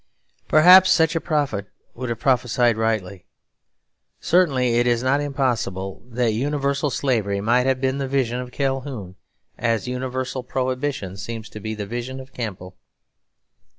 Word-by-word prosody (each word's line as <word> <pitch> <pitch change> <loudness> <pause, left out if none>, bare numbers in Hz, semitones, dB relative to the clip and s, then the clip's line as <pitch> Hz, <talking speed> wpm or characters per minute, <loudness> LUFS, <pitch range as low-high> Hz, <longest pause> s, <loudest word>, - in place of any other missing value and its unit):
Perhaps 180 +4 +8
such 165 -3 +3
a 165 - 0
prophet 140 - -1 0.3
would 125 0 -5
have 115 -1 -3
prophesied 120 -2 +2
rightly. 110 -5 -2 0.9
Certainly 130 -9 +2
it 120 - +2
is 120 0 +1
not 135 +3 +2
impossible 120 -9 -2
that 120 -1 0
universal 140 +3 0
Slavery 110 -8 0
might 120 +5 +2
have 130 -1 +1
been 130 +1 0
the 135 - -2
vision 130 -3 0
of 125 0 -6
Calhoun 135 -8 -3 0.4
as 115 0 0
universal 130 +1 -3
Prohibition 130 -5 -3
seems 110 +3 -6
to 105 - -9
be 110 +1 -4
the 105 -1 -5
vision 120 +5 -5
of 130 0 -12
Campbell. 95 -6 -6
125 Hz, 145 wpm, -22 LUFS, 110-135 Hz, 0.9 s, Perhaps